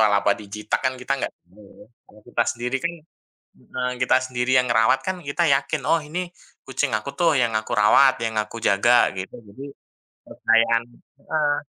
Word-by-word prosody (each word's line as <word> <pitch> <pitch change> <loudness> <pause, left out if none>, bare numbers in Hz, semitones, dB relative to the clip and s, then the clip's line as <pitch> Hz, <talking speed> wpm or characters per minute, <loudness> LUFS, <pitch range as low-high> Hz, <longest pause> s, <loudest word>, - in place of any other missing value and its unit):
toel-toel, 105 -2 +4
apa 100 0 +2
dijitak, 105 +1 -4
kan 130 - +1
kita 125 +2 -3
nggak - - -3
tahu 95 +4 -22
ya, 100 - -17 0.2
kalau 105 - -19
kita 120 -1 0
sendiri 125 +2 -3
kan 170 0 -1 0.7
heeh 125 0 -4
kita - - +4
sendiri 125 0 -2
yang 125 0 +1
ngerawat 115 +4 +3
kan 185 - -1
kita 150 +5 0
yakin, 135 0 0
oh 165 - +4
ini 175 +4 -5 0.4
kucing 135 0 -2
aku 110 +6 -5
tuh 165 -3 +3
yang 120 -3 +1
aku 110 - -7
rawat, 105 +6 +5
yang 110 -1 -3
aku 105 +2 -3
jaga 120 +5 +4
gitu, 95 0 -6
jadi 135 +8 -10 0.6
kepercayaan 115 +1 +2 0.4
heeh, 150 -2 0
125 Hz, 180 wpm, -22 LUFS, 110-140 Hz, 0.7 s, rawat